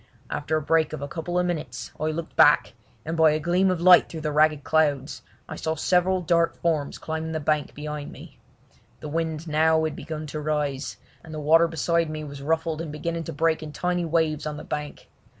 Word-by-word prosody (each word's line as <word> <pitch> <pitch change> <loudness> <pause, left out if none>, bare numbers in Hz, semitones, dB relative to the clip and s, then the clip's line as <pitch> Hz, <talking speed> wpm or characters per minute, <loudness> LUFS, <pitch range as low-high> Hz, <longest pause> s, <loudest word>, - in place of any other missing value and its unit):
After 155 +2 -1
a - - -2
break 160 0 +2
of 145 - -5
a - - -3
couple 170 +4 -4
of 180 - +2
minutes 175 -4 -4
I 155 - -1
looked 155 +1 -4
back, - - +5 0.3
and 160 +1 -3
by 160 -1 +5
a 155 - 0
gleam 175 +4 +2
of 185 -2 0
light 180 +1 +7
through 160 - -6
the 155 -1 -2
ragged 150 -1 +3
clouds 145 0 +1 0.3
I - - -6
saw 160 0 -2
several 180 +3 +2
dark 170 0 +2
forms 155 -4 -1
climbing 160 0 -4
the 160 - -1
bank 150 -1 -1
behind 150 0 -6
me. 145 -4 -13 0.6
The 150 - -7
wind 160 0 -2
had 165 - -9
now 160 +1 +3
begun 155 +1 -6
to 155 - -3
rise, 150 -2 -2 0.3
and 160 - -11
the 155 - -5
water 165 +3 +5
beside 165 0 0
me 155 0 -5
was 140 -1 -8
ruffled 160 +2 -1
and 165 -3 -5
beginning 165 +2 -4
to - - -5
break 160 +2 +1
in 155 -1 -7
tiny 180 +1 -1
waves 160 -2 0
on 150 0 -4
the - - -8
bank. 150 -1 -6
155 Hz, 215 wpm, -25 LUFS, 150-165 Hz, 0.6 s, light